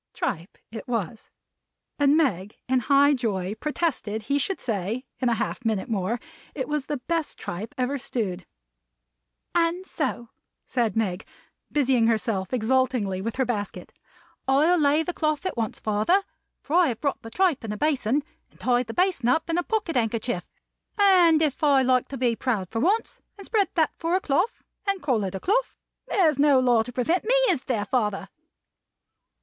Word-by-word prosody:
Tripe 180 -7 -3
it 225 - -8
was; 225 -3 -3 0.7
and 285 +1 +4
Meg, 210 - 0
in 260 0 +2
high 280 +4 +4
joy, 205 -7 -1
protested 295 -9 -2
he 280 +6 0
should 380 +7 -2
say, 220 +3 -3
in 250 - +1
half 235 +2 -2
a - - 0
minute 220 +1 -1
more, 215 +2 -1 0.4
it 265 - -3
was 295 -2 -2
the 295 - -2
best 325 +4 -2
tripe 215 +11 -6
ever 260 +2 -1
stewed. 195 -8 -3 1.1
"And 345 +2 +1
so," 235 -10 -3 0.4
said 235 -4 0
Meg, 205 -3 -1 0.5
busying 260 -5 +3
herself 215 -4 0
exultingly 250 -5 +1
with 230 +3 -3
her 265 - +1
basket; 210 -5 -4 0.5
"I'll 305 +7 +4
lay 295 +1 +3
the 355 - -3
cloth 310 +1 -1
at 370 - -2
once, 225 -3 -3
father; 220 - +2 0.4
for 305 - -2
I 360 -2 +5
have 235 -5 -3
brought 285 -2 -1
the 225 - -9
tripe 335 -1 +1
in 220 - -4
a 210 - -4
basin, 280 -1 +1 0.3
and - - -26
tied 245 -1 +1
the 225 - -7
basin 355 -10 +1
up 320 +6 +1
in 330 - 0
a - - -1
pocket 420 -6 -2
handkerchief; 230 -3 -1 0.5
and 355 -6 +5
if 300 -1 -1
I 280 -3 +5
like 255 -1 +2
to 275 - -6
be 240 -2 +1
proud 215 -8 -1
for 225 - -2
once, 400 - 0 0.2
and 395 - -10
spread 410 -5 +1
that 320 -2 +3
for 335 +1 0
a - - +3
cloth, 355 +6 0 0.2
and 395 -1 +1
call 250 -7 +1
it 190 0 -4
a - - -3
cloth, 485 - 0 0.3
there's 320 - +2
no 285 -2 +5
law 245 -3 +4
to 245 - -5
prevent 290 +9 0
me; 485 +3 +2
is 285 -8 0
there 220 -6 -1
father?" 210 -5 -1
255 Hz, 180 wpm, -25 LUFS, 225-310 Hz, 1.1 s, I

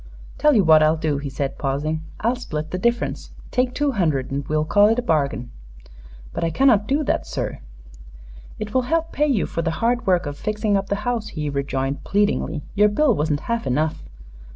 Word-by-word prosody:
"Tell 300 -2 +4
you 210 - +5
what 160 -2 +6
I'll 155 +1 +4
do," 155 -3 -1
he 140 0 -5
said, 135 0 -4
pausing. 150 +3 -2 0.2
"I'll 235 +3 +1
split 155 -11 -5
the 185 - -2
difference. 235 +3 -1 0.2
Take 250 0 0
two 290 -1 +1
hundred 155 - 0
and 140 0 -3
well 155 0 0
call 205 +6 +5
it 225 +2 +2
a - - +1
bargain." 140 - 0 0.8
"But - - -3
I 165 - +1
cannot 215 - +3
do 290 +3 +1
that, - - -1
sir." - - -4 1.0
"It 215 0 -6
will 255 - +3
help 330 0 0
pay 300 - +1
you 250 -9 +1
for 165 - -3
the 165 - -1
hard 240 0 0
work 180 -2 +3
of 145 0 -6
fixing 215 -1 0
up 195 0 0
the 200 - +1
house," 240 -3 -1
he 150 -2 -4
rejoined, 140 0 -2
pleadingly. 200 -7 0
"Your 210 +1 +4
bill 255 +5 +3
wasn't 150 -2 0
half 235 0 -2
enough." 150 +5 0
180 Hz, 200 wpm, -22 LUFS, 150-235 Hz, 1.0 s, what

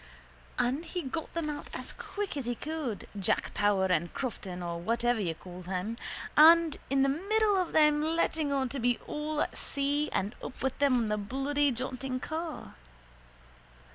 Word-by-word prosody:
And 265 +6 +1
he 350 +1 -4
got 310 +5 -4
them 335 -2 -1
out 295 -1 -4
as - - -5
quick 405 -4 -5
as 275 -4 -3
he 245 - 0
could, 295 -7 -4
Jack 195 - 0
Power 205 -2 +3
and 175 -2 +1
Crofton 190 -8 -4
or 170 -1 -3
whatever 235 +4 +1
you 170 -4 -1
call 180 +2 -10
him 185 +5 -3 0.4
and 325 +1 +8
him - - -11
in 270 0 +3
the 275 - +3
middle 410 +8 +2
of 365 -3 0
them 300 -1 +5
letting 315 -1 +1
on 270 -2 +1
to 275 - -4
be 245 0 +2
all 300 0 -2
at - - -6
sea 285 +2 0
and 200 +4 -1
up 255 - -7
with 265 -1 -1
them 280 -3 +4
on 230 -2 +1
the 210 - +1
bloody 275 +6 +1
jaunting 255 +1 -3
car. 320 +3 -5
270 Hz, 180 wpm, -30 LUFS, 225-305 Hz, 0.4 s, and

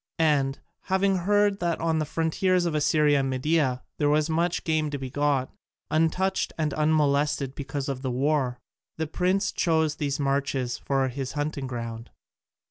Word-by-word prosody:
And, 145 -4 +2 0.3
having 190 0 +2
heard 205 +2 +2
that 170 -1 -1
on 160 -1 +1
the 155 - 0
frontiers 175 +3 +1
of 170 - 0
Assyria 150 -1 +3
and 135 -1 0
Media 130 -1 +1 0.2
there 145 -1 +3
was 155 +2 +2
much 170 +2 0
game 155 -2 0
to 145 - -3
be 130 -2 -6
got, 145 -2 0 0.4
untouched 180 +5 +1
and 155 -3 -1
unmolested 150 -3 +1
because 140 0 -4
of 135 -2 -3
the 130 - -2
war, 130 0 0 0.4
the 160 - -1
prince 185 +5 0
chose 160 -3 +1
these 145 -1 -2
marches 135 -3 0
for 135 -1 0
his 130 0 -5
hunting 145 -2 -3
ground. 115 -2 -6
150 Hz, 160 wpm, -26 LUFS, 135-165 Hz, 0.4 s, Assyria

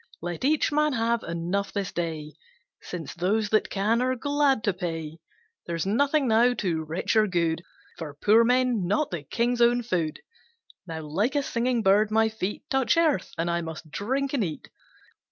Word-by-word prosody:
Let 175 +3 -5
each 300 +3 +2
man 300 0 +2
have 230 -1 +1
enough 180 +4 -2
this 200 -2 -3
day, 160 -3 -4 0.5
Since 165 -5 -6
those 205 +5 0
that 215 0 +2
can 215 +4 +1
are 255 +1 +1
glad 285 -2 +1
to 205 - +1
pay; 165 -3 -5 0.5
There's 170 -1 -2
nothing 280 +7 +2
now 235 +2 +4
too 165 -7 -1
rich 160 +7 -2
or 215 -1 +5
good 170 -3 0 0.4
For 150 -3 -6
poor 215 +9 +5
men, 245 -5 +2
not 210 - 0
the 170 -4 -3
King's 240 - -1
own 240 +1 +4
food. 170 -8 -2 0.7
Now 160 -1 -5
like 195 - -1
a 285 - +2
singing 235 -2 0
bird 205 +2 +4
my 220 +1 +3
feet 210 -2 -4
Touch 270 +4 +2
earth, 320 -4 +2
and 165 - -1
I 170 0 0
must 160 -1 -8
drink 265 - -2
and 260 -6 +1
eat. 160 -5 -5
210 Hz, 175 wpm, -26 LUFS, 170-245 Hz, 0.7 s, or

